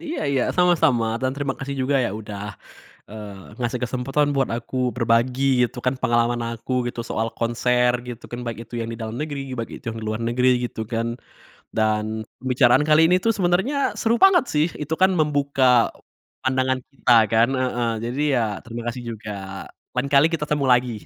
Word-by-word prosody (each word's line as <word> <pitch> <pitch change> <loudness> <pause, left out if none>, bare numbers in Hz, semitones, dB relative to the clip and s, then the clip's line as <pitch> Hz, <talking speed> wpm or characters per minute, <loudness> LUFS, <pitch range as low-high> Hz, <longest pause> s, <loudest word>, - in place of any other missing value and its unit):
Iya 325 - -4
iya, 135 -3 +1
sama-sama, 160 -10 +3 0.2
dan 130 - +1
terima 140 -1 -2
kasih 140 +1 -4
juga 135 +2 +1
ya 115 - -1
udah, 100 -2 -7 0.7
eee, 105 -1 -10
ngasih 120 +1 -2
kesempatan 135 +4 0
buat 135 - +1
aku 120 - -7 0.2
berbagi 120 +2 +1 0.2
gitu 125 - -12
kan 125 +1 +2
pengalaman 120 -1 +1
aku 115 +2 -6 0.2
gitu 120 - -5
soal 110 +1 -1
konser 125 +1 +2 0.2
gitu 120 -1 -8
kan, 120 - -5
baik 115 -1 -4
itu 115 +2 -13
yang 115 - -3
di - - -6
dalam 110 +1 -5
negeri 150 -2 -3 0.2
baik 115 - -4
itu - - -14
yang 115 - -7
luar 110 +1 -2
negeri 125 +2 +2 0.2
gitu 120 - -5
kan, 115 0 0 0.7
dan 110 -1 +1 0.4
pembicaraan 130 +2 +3
kali 155 +1 +6
ini - - +6
tuh 230 - +5
sebenernya 190 +9 +1 0.2
seru 230 0 +2
banget 385 -3 +7
sih 150 +1 +3
itu 150 +2 -3
kan 190 - +6
membuka, 140 -3 +1 0.8
pandangan 130 0 +1
kita 135 -2 0 0.2
kan, 115 +1 +4
heeh, 125 -2 0 0.2
jadi 125 +4 -3
ya 120 - +2 0.2
terima 120 0 -7
kasih 120 +1 -4
juga. 110 -1 -8 0.7
Lain 130 +2 -1
kali 140 +2 +7
kita 165 -3 -1
ketemu 150 -2 0
lagi, 125 0 +1
125 Hz, 180 wpm, -23 LUFS, 115-140 Hz, 0.8 s, banget